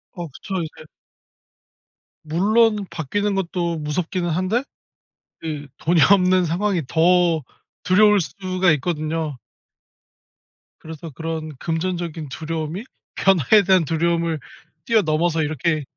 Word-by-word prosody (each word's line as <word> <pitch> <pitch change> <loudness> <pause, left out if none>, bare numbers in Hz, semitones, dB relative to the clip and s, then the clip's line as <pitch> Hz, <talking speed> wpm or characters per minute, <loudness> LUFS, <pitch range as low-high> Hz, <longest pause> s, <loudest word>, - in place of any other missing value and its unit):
어 175 -2 -5
그쵸. 190 +7 -7
이제 155 0 -10 1.4
물론 210 +6 +2
바뀌는 200 +7 -1
것도 175 -3 -1
무섭기는 170 +4 -2
한데 185 +9 0 0.8
그 150 -3 -5
돈이 170 +1 +2
없는 185 -1 +4
상황이 175 +2 0
더 170 -1 +3 0.4
두려울 210 +2 +5
수가 185 +3 0
있거든요. 155 -1 -2 1.4
그래서 160 0 -9
그런 160 +1 -5
'금전적인 165 -2 -3
두려움이 160 +5 -4 0.3
변화에 195 +2 +4
대한 185 -3 +4
두려움을 165 +1 0 0.5
뛰어 230 -2 +4
넘어서 160 0 +1
이렇게 155 +1 -1
170 Hz, 250 characters per minute, -22 LUFS, 155-185 Hz, 1.4 s, 두려울